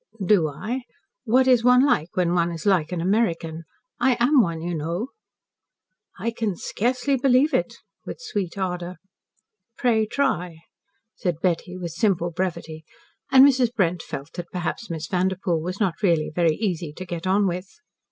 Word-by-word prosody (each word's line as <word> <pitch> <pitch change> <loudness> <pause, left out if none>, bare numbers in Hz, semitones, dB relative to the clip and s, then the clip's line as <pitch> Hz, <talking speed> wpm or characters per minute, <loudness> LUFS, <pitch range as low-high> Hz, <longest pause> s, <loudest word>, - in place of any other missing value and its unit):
"Do 175 -5 +4
I? 235 - -5 0.4
What 255 +3 +3
is 250 -3 +5
one 250 +2 +6
like 175 - 0
when 175 -1 +2
one 170 -1 +1
is 165 +2 -7
like 185 -6 +2
an 175 -2 -2
American? 170 -5 0 0.3
I 255 0 +3
am 255 +3 +5
one, 170 -5 -1
you 175 +2 -4
know." 170 - -3 1.1
"I 230 - -2
can 225 -4 -2
scarcely 250 +9 -1
believe 265 +3 +3
it," - - 0 0.3
with - - -7
sweet 200 - -4
ardour. 180 -2 -3 0.8
"Pray 220 -3 +2
try," 180 -12 -1 0.5
said 175 -5 -2
Betty 180 +1 -1
with 175 -2 -5
simple 175 -1 0
brevity, 160 -3 -4 0.5
and 265 0 +9
Mrs. 260 -4 +3
Brent 180 -5 +1
felt 140 +1 -8
that 175 -1 -7
perhaps 180 +5 -4
Miss 160 -2 -4
Vanderpoel 180 -1 0
was 180 +4 -5
not 190 -5 -1
really 170 -6 +2
very 165 -2 +2
easy 175 -7 -2
to 185 - -8
get 175 0 -5
on 200 +2 +3
with. 180 +1 -2
185 Hz, 160 wpm, -24 LUFS, 170-230 Hz, 1.1 s, and